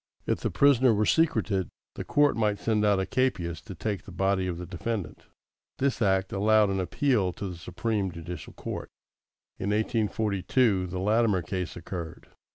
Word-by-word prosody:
If - - 0
the - - -1
prisoner 130 -4 +4
were 105 +1 +2
secreted, 110 - +2 0.3
the - - -5
court 145 0 +3
might 105 -2 +1
send 105 0 0
out 100 -2 +3
a 95 - 0
capias 95 -12 -1
to 95 - -8
take 100 +2 -3
the - - -10
body 95 +1 +1
of 90 -2 -3
the 90 - -6
defendant. 95 +3 -5 0.5
This 135 -2 0
act 95 -2 +2
allowed 105 +1 +4
an 95 - -1
appeal 100 0 +1
to 100 - -5
the 90 - -6
Supreme 95 +3 -2
Judicial 85 -2 -8
Court. - - -6 0.7
In 95 - -2
1842, 105 -1 +1
the 90 +1 -5
Latimer 105 -1 +2
case 90 -1 -4
occurred. 85 -1 -7
100 Hz, 165 wpm, -27 LUFS, 90-110 Hz, 0.7 s, prisoner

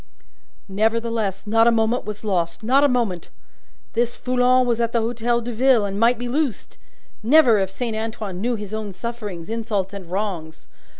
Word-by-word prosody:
Nevertheless, 220 -1 -1
not 225 +2 +4
a - - +6
moment 225 +2 +1
was 210 0 -6
lost; 175 -3 -1
not 265 +5 +4
a - - +6
moment! 235 -9 -1 0.6
This 240 +1 0
Foulon 255 0 +2
was 235 -1 0
at 230 0 -1
the 235 - +3
Hotel 235 +1 0
de 240 +1 -5
Ville, 245 -2 +3
and 200 0 -3
might 235 +2 +4
be 245 +1 -4
loosed. 270 -1 -2 0.4
Never, 240 -2 +5
if 190 -1 0
Saint 225 +3 -4
Antoine 220 -4 -4
knew 240 +2 0
his 210 -1 -7
own 215 -2 -4
sufferings, 205 -5 -6
insults, 215 -4 -2
and 190 -4 -8
wrongs! 180 -5 -4
225 Hz, 175 wpm, -22 LUFS, 200-240 Hz, 0.6 s, a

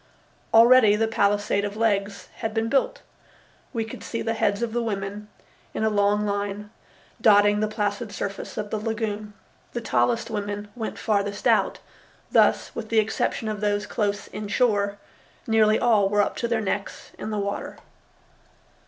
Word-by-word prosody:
Already 230 -2 +7
the 225 +1 +1
palisade 205 -1 +1
of 205 +1 -4
legs 200 -2 -1
had 220 0 -4
been 225 0 0
built. - - 0 0.7
We 230 -3 -2
could 225 - -9
see 230 - -4
the 225 - -1
heads 205 -1 0
of 230 -2 -2
the 240 - 0
women, 205 -1 -4 0.5
in - - -1
a 220 - +2
long 205 0 +2
line, 205 +1 -3 0.5
dotting 205 -1 +5
the 215 - +1
placid 210 0 -2
surface 200 -1 -5
of 210 -1 -4
the 215 - -1
lagoon. 215 -1 -3 0.4
The 240 - -3
tallest 235 0 0
women 205 -1 -4
went 225 -3 -5
farthest 205 -2 -1
out, - - +2 0.5
thus, - - +3
with - - -6
the 225 - 0
exception 220 +1 0
of 210 -1 -3
those 205 0 0
close 205 -2 -2
inshore, 205 -1 0 0.5
nearly 220 -2 +4
all 215 -5 +3
were 205 0 +3
up - - -3
to 235 - -1
their 230 -1 0
necks 200 -1 -4
in - - -5
the 215 - -2
water. 200 0 -4
210 Hz, 160 wpm, -24 LUFS, 205-225 Hz, 0.7 s, Already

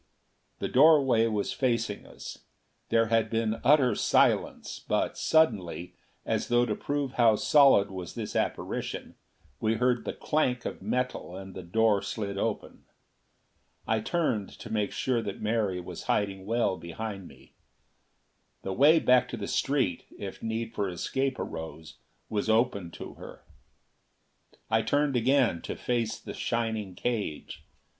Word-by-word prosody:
The - - -2
doorway 135 -5 +5
was 105 -3 -1
facing 115 -5 -1
us. - - -9 0.5
There 115 0 +4
had 115 -1 +2
been 115 0 -1
utter 135 -5 +5
silence; - - +1
but - - -1
suddenly, 100 - +1 0.3
as - - -1
though 120 0 +3
to - - -1
prove 145 -2 -2
how 115 -3 +5
solid 135 -6 +5
was 90 -2 -7
this - - -5
apparition, - - -3 0.5
we 110 0 +1
heard 125 +1 +1
the - - -4
clank 125 -5 0
of - - -5
metal, 125 -7 -2
and 95 0 -8
the 95 - -7
door 105 +3 +2
slid 100 0 -4
open. 110 -1 -3 1.0
I 110 0 +1
turned 115 - -1
to 110 - -8
make 105 -2 0
sure 125 -3 0
that 100 -3 -5
Mary 105 -4 0
was 90 - -8
hiding 95 -2 -1
well 115 -4 +1
behind 95 +2 -6
me. - - -18 1.1
The 95 - -3
way 145 - +6
back 125 -4 +4
to 120 - -5
the 105 - -4
street, 135 -12 0
if - - -7
need 115 0 -3
for 100 -2 -1
escape 135 +9 -2
arose, 80 -1 -7 0.3
was 105 0 -2
open 110 -5 +2
to - - -8
her. - - -11 1.2
I 110 0 +2
turned 145 +4 +1
again, 125 -6 +2
to - - -5
face 115 -3 -1
the - - -8
shining 110 -5 -2
cage. 105 -8 -3
115 Hz, 145 wpm, -28 LUFS, 100-125 Hz, 1.2 s, way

